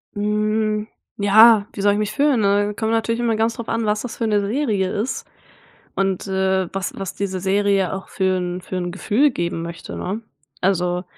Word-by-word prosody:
Hm. 215 +1 0 0.3
Ja, 215 +1 +6
wie 200 - -5
soll 205 0 +4
ich 205 - -1
mich 210 0 -1
fühlen, 285 -5 +2
ne? 205 +1 +2
Kommt 220 +1 -1
natürlich 230 +1 0
immer 230 -2 +1
ganz 225 +1 0
drauf 235 - -7
an, 230 -1 0
was 210 0 0
das 245 -3 -7
für 230 - -1
'ne 210 -1 +2
Serie 210 -6 0
ist 220 +6 -3 0.7
und, 195 -1 0
äh, 190 -1 +1
was 195 -1 -2
was 195 -1 -5
diese 195 -2 -3
Serie 195 0 +1
auch 190 0 -6
für 190 -1 0
'n 180 0 -3
für 185 - -6
'n 175 -1 -2
Gefühl 225 +9 +2
geben 170 -6 -3
möchte, 170 0 -7
ne? 200 +5 -3 0.4
Also 180 -1 0
205 Hz, 195 wpm, -21 LUFS, 190-220 Hz, 0.7 s, Ja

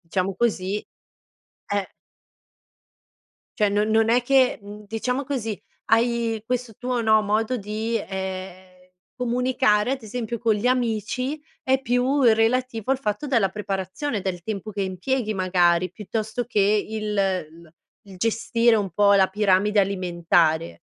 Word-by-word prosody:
diciamo 185 +2 -2
così, 205 -4 0 0.9
eh 200 -1 -2 1.7
cioè, 210 -1 +4
non 210 +1 +1
non 225 +1 +3
è 245 +1 +4
che, 260 -1 +3
mhmm, 205 +1 -10
diciamo 250 +6 -2
così, 230 -6 -3 0.3
hai 230 -1 +1
questo 250 -2 -3
tuo, 250 -1 -2
no, 220 -1 +4
modo 220 +4 0
di, 220 +2 -2
ehm, 185 -1 -7 0.2
comunicare, 250 -3 +1
ad 260 -4 -7
esempio, 235 +1 -4
con 225 -1 +2
gli 210 +4 0
amici 255 +4 -1 0.2
è 265 0 +2
più 260 +3 +1
relativo 230 +1 +2
al 270 - +1
fatto 210 +3 -2
della 230 -9 +2
preparazione, 200 +4 -3
del 180 -2 -4
tempo 215 -1 -5
che 205 -1 -4
impieghi 215 +5 -2
magari, 180 -2 +2
piuttosto 220 +3 -3
che 235 -4 -1 0.3
il 215 -1 -3
l 170 -4 -2 0.3
il 190 - -11
gestire 230 +3 +2
un 200 -2 -1
po' 200 +2 +4
la 190 -1 +5
piramide 205 +1 +2
alimentare. 170 -4 +1
215 Hz, 135 wpm, -24 LUFS, 190-240 Hz, 1.7 s, la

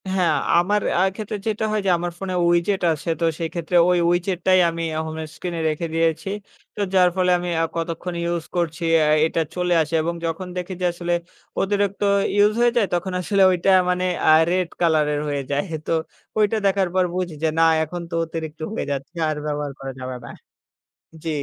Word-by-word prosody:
হ্যাঁ 180 -3 +2 0.3
আমার 205 +4 +1 0.2
আ - - +3
ক্ষেত্রে 215 0 -4
যেটা 220 0 0
হয় 215 -1 0
যে - - +2
আমার 175 +1 -3
ফোনে 190 -1 -4 0.2
WeChat 175 +3 +1
আছে, 160 +2 -6
তো 170 - +1
সেই 165 -1 -2
ক্ষেত্রে 170 0 -3
ওই 180 - +3
WeChat 175 +1 0
টাই 185 0 +6
আমি 165 0 -4 0.2
হোম 160 0 -6 0.2
স্ক্রিনে 175 -2 -4
রেখে 155 +2 -2
দিয়েছি, 165 +3 0 0.5
তো 210 - -3
যার 180 -1 +5
ফলে 180 -1 +2
আমি 175 0 -4
আ - - +2
কতক্ষণ 165 +1 -3
ইউজ 170 -1 -1
করছি 170 -1 -1 0.2
অ্যা 155 -1 +3 0.2
এটা 165 +1 0
চলে 180 -1 +1
আসে 160 +1 -4
এবং 170 +2 -2
যখন 165 +3 -3
দেখি 180 +1 -4
যে - - +1
আসলে 175 0 -2 0.5
অতিরিক্ত 200 0 0 0.3
ইউজ 205 +1 +4
হয়ে 240 0 +4
যায় 225 - +4
তখন 175 +2 -1
আসলে 200 +2 +1
ওইটা 180 +1 +1 0.2
মানে 180 0 0 0.2
আ - - +8 0.2
রেড 180 -1 0
কালারের 155 -3 +2
হয়ে 145 -1 -1
যায় 145 +1 +1 0.2
তো - - -1 0.5
ওইটা 215 +1 +3
দেখার 195 -1 +2
পর 185 - +4
বুঝি 180 -3 -3
যে - - +4
না - - +6 0.2
এখন 175 +3 -5
তো - - -10
অতিরিক্ত 160 -1 -6
হয়ে - - -3
যাচ্ছে 140 +4 -5
আর 155 - -1
ব্যবহার 145 -1 -2
করা 135 0 -5
যাবে 130 0 -5
না - - -9 1.0
জি। - - -3
175 Hz, 195 wpm, -22 LUFS, 165-185 Hz, 1.0 s, আ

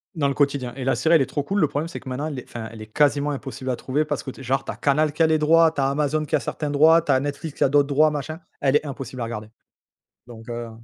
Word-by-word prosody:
dans 145 -4 +1
le 140 - 0
quotidien. 140 -4 0
Et 135 - -5
la 135 - +1
série 165 +1 +3
elle 160 - +5
est - - +2
trop 135 +3 -3
cool, 195 +8 -1
le 155 - +4
problème 150 +3 -2
c'est 170 - -8
que 135 - -9
maintenant 135 +4 -3
elle 145 -4 -5
est, - - -9
enfin 115 -2 -7
elle 110 -1 -11
est 110 - -9
quasiment 145 +4 +2
impossible 135 -1 -6
à 125 - -1
trouver 140 +4 -1
parce 150 -2 -3
que 135 0 -8
genre 135 +2 -1
tu - - -3
as - - -8
Canal 150 +1 +1
qui 165 - +2
a - - +5
les 160 0 +3
droits, 160 +1 +5
tu 145 - -6
as 135 - +2
Amazon 150 +2 0
qui - - 0
a - - 0
certains 150 - -4
droits, 160 +3 +5
tu 150 -4 +1
as 130 - +3
Netflix 145 +1 -5
qui - - +2
a - - +3
d'autres 145 0 +3
droits 150 +2 +3
machin, 155 +3 -5 0.2
elle 135 0 +2
est 150 - +2
impossible 135 -2 -6
à - - 0
regarder. 110 -2 -5 0.8
Donc, 115 -2 -12
heu 120 0 -5
145 Hz, 310 wpm, -23 LUFS, 130-155 Hz, 0.8 s, elle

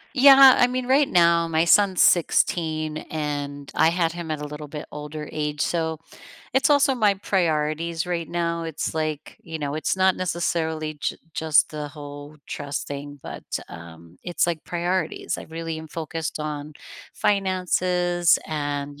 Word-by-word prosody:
Yeah, 270 0 +9
I 245 - +6
mean, 250 0 -3
right 275 +2 +4
now, 170 -1 +4
my 160 0 +2
son's 190 +2 +4
16, 155 -2 +2
and 145 -2 -4
I 160 - +4
had 170 -1 +1
him 170 -1 -7
at 155 -1 -3
a - - -4
little 150 0 -8
bit 150 +1 -7
older 150 +1 -7
age, 150 -1 -3
so 160 -2 -1 0.6
it's 270 +2 +3
also 280 -2 +4
my 210 -5 +3
priorities 165 -3 -1
right 170 -2 -3
now, 170 -1 -1
it's, 160 -2 -4
like, 155 -2 -3
you 165 -1 -6
know, 145 -1 -3
it's 155 +4 -1
not 190 0 +4
necessarily 160 -3 -2
j - - -2 0.2
just 160 -2 +3
the 150 -1 -5
whole 145 0 -10
trust 145 0 -4
thing, 145 0 -7
but, - - -8 0.3
um, 85 0 -12
it's, 175 -1 0
like, 170 -3 -2
priorities, 175 -1 -2
I - - -7
really 165 0 -5
am 160 0 -9
focused 160 0 -4
on 150 0 -5 0.4
finances 180 -3 +1
and, 145 -1 -4
160 Hz, 160 wpm, -24 LUFS, 150-175 Hz, 0.6 s, Yeah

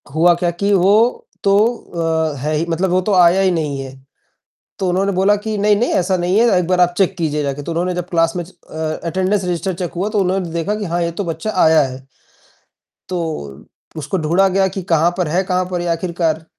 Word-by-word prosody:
हुआ 175 +2 +5
क्या 175 0 -1
कि 200 +4 -1
वो 205 +6 +3 0.2
तो 195 0 +3 0.8
अ, - - -8
है 150 +3 -1
ही 155 +2 0
मतलब 175 +3 0
वो 185 +1 +2
तो 200 +2 -1
आया 180 +1 +5
ही 190 -1 +3
नहीं 150 -5 -2
है। 135 -1 -7 0.9
तो 190 - -1
उन्होंने 195 +2 +1
बोला 195 +3 +3
कि 215 +1 -4
नहीं-नहीं 210 +3 +2
ऐसा 185 +1 +1
नहीं 180 +4 +1
है 230 -5 +4
एक 175 - -2
बार 185 -1 +1
आप 175 0 +3
चेक 195 -1 +2
कीजिए 150 -3 -1
जाके 140 0 -3
तो 170 - -5
उन्होंने 175 +2 -1
जब 180 -1 -4
क्लास 165 0 +1
में 175 - -2
अ, 160 -3 -6
अटेंडेंस 190 +3 0
रजिस्टर 180 +2 -2
चेक 175 0 -5
हुआ 195 +4 -1
तो 210 - 0
उन्होंने 185 -2 0
देखा 170 +5 -2
कि 210 -1 -4
हाँ, 175 +1 -1
ये 170 - -1
तो 190 +4 -4
बच्चा 165 +6 -3
आया 160 -1 +5
है। 130 0 -7 1.1
तो 160 - -5 0.3
उसको 155 +5 -3
ढूढ़ा 175 +5 +2
गया 190 0 +2
कि 190 0 -5
कहाँ 165 +2 +3
पर 180 -4 0
है 175 +5 +1
कहाँ 185 0 0
पर 180 - -2
ये 175 - -3
आखिरकार। 165 -2 -1
175 Hz, 220 wpm, -18 LUFS, 165-190 Hz, 1.1 s, हुआ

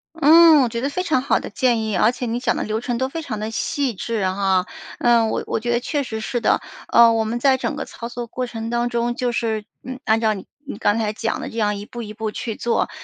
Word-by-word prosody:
嗯， 325 -1 +7
我 250 - +2
觉 235 0 -4
得 275 - -1
非 325 +6 -2
常 315 -7 +1
好 275 - +2
的 - - -7
建 235 +1 +1
议， 215 -1 -2
而 215 +5 +4
且 250 0 -5
你 235 +1 -2
讲 245 -2 0
的 - - -2
流 215 +1 -2
程 240 0 -2
都 260 +1 0
非 325 +5 -5
常 230 -8 -5
地 215 +1 -4
细 260 +2 -1
致， 215 +1 -2
哈。 190 -1 +1 0.3
呃， 235 -2 +4
我 - - -2
我 - - -1
觉 240 +2 -2
得 240 0 +2
确 290 +3 -1
实 220 -4 -5
是 240 +2 -2
的， - - +2 0.3
呃， 235 -1 +6
我 225 -1 +1
们 225 +2 -2
在 265 +1 +4
整 285 +3 -3
个 285 - -3
操 235 - -8
作 240 0 -6
过 250 +2 -4
程 225 -1 -5
当 240 0 0
中， 240 0 -1
就 250 -1 -1
是， 220 -2 -1 0.2
嗯， 260 0 -7
按 220 +1 +2
照 220 -1 +2
你 195 - -9 0.2
你 275 - -6
刚 205 +2 +2
才 215 -2 0
讲 225 +1 -3
的 - - -5
这 230 - -7
样 210 -2 +1
一 200 - -7
步 240 +2 -7
一 215 -1 -8
步 220 0 -3
去 225 -1 -4
做。 235 - 0
235 Hz, 295 characters per minute, -21 LUFS, 220-255 Hz, 0.3 s, 嗯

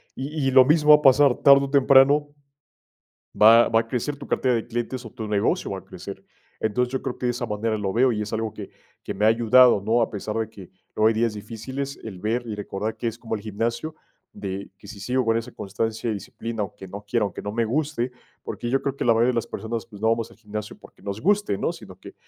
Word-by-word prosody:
Y 140 +1 -3
y - - +2
lo 130 -1 +7
mismo 150 +1 +3
va - - +11
a 150 - 0
pasar 135 -1 +6
tarde 140 -1 +6
o - - -7
temprano, 140 +1 +5 1.1
va 115 +2 +7
va 115 0 +3
a - - -5
crecer 130 +5 -2
tu 140 - -10
cartera 130 -2 +1
de 115 - -3
clientes 120 +2 -4
o 115 - -9
tu 110 -2 -7
negocio 105 -1 0
va - - -4
a - - -12
crecer. - - -10 0.4
Entonces, 125 +3 0
yo 130 - -2
creo 130 -3 -4
que 125 - -2
de 120 - +2
esa 120 0 -4
manera 110 +1 -2
lo 100 -2 -2
veo 125 +3 +3
y 105 - -2
es 105 - -7
algo 110 -1 -2
que - - -9 0.3
que - - -5
me 105 - -1
ha - - +7
ayudado, 115 0 +5
¿no? 115 +3 +2
A - - -1
pesar 105 +1 -5
de 110 - -2
que 100 -5 -13 0.2
luego 110 +1 +4
hay 110 - +1
días 115 0 0
difíciles, 125 +6 -6
el 95 -5 -8
ver 115 +4 -2
y 110 - -4
recordar 105 +1 -4
que 115 +2 -5
es 115 +1 -7
como 115 -2 -4
el 105 - -4
gimnasio 115 +8 -3 0.4
de 95 0 -6
que 105 - -15
sí 105 - -9
sigo 125 +6 -1
con 115 0 +2
esa 115 +2 -4
constancia 110 +3 -3
y - - -1
disciplina, 115 +2 -5
aunque 95 -1 -8
no 100 +3 -8
quiera, 115 +1 +1
aunque 100 - -5
no 105 - -5
me 115 +1 0
guste, 130 0 -1 0.3
porque 120 - -5
yo 135 +2 +2
creo 140 -1 -2
que - - -3
la 115 - +5
mayoría 115 +2 +3
de 125 - +1
las 115 0 -1
personas, 115 0 -5
no 105 +2 -1
vamos 115 0 -1
al - - -19
gimnasio 105 0 -7
porque - - -18
nos 100 +1 -5
guste, 205 - +1
¿no? - - -1
Sino - - -12
que - - -12
115 Hz, 255 wpm, -24 LUFS, 105-130 Hz, 1.1 s, va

